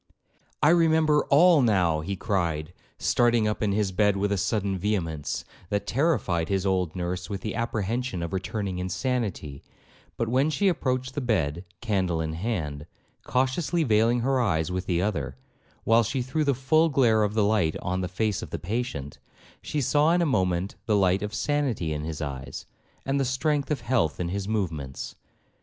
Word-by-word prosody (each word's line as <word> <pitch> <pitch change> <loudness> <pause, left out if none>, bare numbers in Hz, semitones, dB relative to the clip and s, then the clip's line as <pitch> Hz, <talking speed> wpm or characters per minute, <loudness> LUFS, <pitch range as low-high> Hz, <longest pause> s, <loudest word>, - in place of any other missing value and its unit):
— - - -17
'I 150 - +6
remember 160 -3 +4
all 165 +2 +6
now,' 90 -9 +2
he 85 +6 -3
cried, 85 -6 -1 0.2
starting 120 -2 +2
up 105 - -2
in 105 -2 +1
his 100 -1 0
bed 100 +1 +2
with 100 +1 0
a - - +2
sudden 100 0 0
vehemence, 90 -6 -2 0.2
that 100 0 -1
terrified 115 - 0
his 95 -1 0
old 95 -3 0
nurse 90 +1 -3
with 100 -2 -4
the 110 - -3
apprehension 115 -3 -2
of 85 - -5
returning 95 0 -3
insanity; 90 - -2 0.6
but 115 - -1
when 130 +6 +2
she 200 +6 +1
approached 130 -7 0
the 145 - -2
bed, 85 - 0 0.2
candle 95 -7 0
in 80 -1 -2
hand, 80 -6 -3 0.4
cautiously 135 +6 +1
veiling 115 -1 +3
her 130 +1 +1
eyes 85 -7 0
with 90 0 -3
the 90 -1 +1
other, 70 -10 -2 0.5
while 115 +1 +5
she 125 +3 -1
threw 135 +5 -1
the 140 -2 +2
full 155 +6 +3
glare 120 -6 +3
of 105 0 0
the 110 - +3
light 100 -7 +2
on 90 +1 -2
the 90 - -2
face 105 +3 -1
of - - -7
the - - -4
patient, 90 - -4 0.4
she 150 - -2
saw 150 +4 +3
in 175 - +3
a - - +2
moment 95 - 0
the 105 -2 +3
light 95 -1 +3
of 105 0 -3
sanity 130 - -1
in 75 0 -4
his 80 -1 -4
eyes, 65 -2 -6 0.4
and 135 +1 0
the - - +2
strength 140 +3 0
of 145 -5 -1
health 115 - 0
in 85 -1 -2
his 100 +1 -3
movements. 80 -11 -3
105 Hz, 185 wpm, -26 LUFS, 90-130 Hz, 0.6 s, I